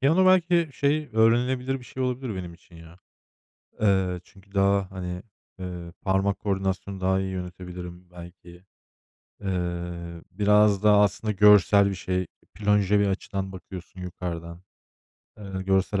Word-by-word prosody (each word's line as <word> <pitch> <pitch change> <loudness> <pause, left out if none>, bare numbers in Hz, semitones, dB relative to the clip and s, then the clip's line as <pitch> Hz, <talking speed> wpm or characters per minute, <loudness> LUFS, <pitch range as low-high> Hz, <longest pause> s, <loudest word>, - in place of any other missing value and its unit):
Piyano 160 +7 +4
belki, 175 -2 +4
şey, 145 +3 0
öğrenilebilir 125 +4 +2
bir 125 - -14
şey 130 - -5
olabilir 125 -2 -2
benim 90 -2 -6
için, 85 0 -19
ya. 80 +1 -14 0.8
Eee, 95 -3 +2
çünkü 100 +1 -21
daha, 100 -1 +2
hani, 90 0 -5 0.4
ııı, 90 -2 -7
parmak 95 +1 +1
koordinasyonu 95 -1 -2
daha 95 +1 +2
iyi 95 0 -3
yönetebilirim, 90 -1 -8
belki. 90 0 -13 0.8
Eee, 85 -2 -4
biraz 105 +1 +3
daha 105 -1 +6
aslında 105 +1 0
görsel 100 0 +6
bir 100 - -3
şey. 90 -1 -2 0.3
Plonje 105 0 +2
bir 100 - +3
açıdan 95 0 -3
bakıyorsun 95 -1 -10
yukarıdan. 85 -1 -6 0.8
Eee, 95 -2 -6
görsel 95 +1 +1
95 Hz, 130 wpm, -26 LUFS, 90-105 Hz, 0.8 s, daha